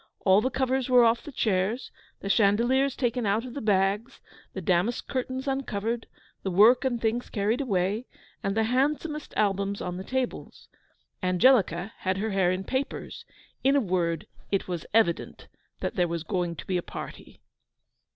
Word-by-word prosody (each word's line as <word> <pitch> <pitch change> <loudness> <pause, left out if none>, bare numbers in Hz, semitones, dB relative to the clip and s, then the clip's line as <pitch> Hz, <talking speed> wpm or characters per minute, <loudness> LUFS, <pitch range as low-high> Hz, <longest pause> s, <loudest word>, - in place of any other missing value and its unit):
All 190 +1 +6
the 255 - 0
covers 260 0 0
were 250 -1 +7
off 230 +1 +3
the 295 - -9
chairs, 215 0 0 0.3
the - - -5
chandeliers 240 +7 +3
taken 240 -3 0
out 215 +4 +1
of 250 - -8
the 285 - -5
bags, 205 +4 +1 0.3
the - - -4
damask 185 +6 0
curtains 260 0 -3
uncovered, 235 -4 -2 0.3
the 195 - -2
work 220 +8 +6
and 250 -3 0
things 230 +2 -1
carried 215 +4 0
away, 205 -1 0 0.3
and 195 +2 -2
the 220 - +3
handsomest 295 +5 0
albums 200 -1 +1
on 180 0 -4
the 190 - -5
tables. 255 +4 -4 0.5
Angelica 190 0 +3
had 190 0 -1
her 215 +2 -2
hair 190 -2 +2
in 185 +1 -2
papers. 260 +7 -4 0.4
In 275 +1 +4
a - - +5
word 175 - -1 0.3
it 195 - 0
was 175 -3 -4
evident 210 -6 +1 0.3
there 180 -2 0
was 170 -1 -3
going 175 -1 -2
to - - -9
be 185 - 0
a - - -1
party. - - -9
215 Hz, 165 wpm, -27 LUFS, 190-255 Hz, 0.5 s, were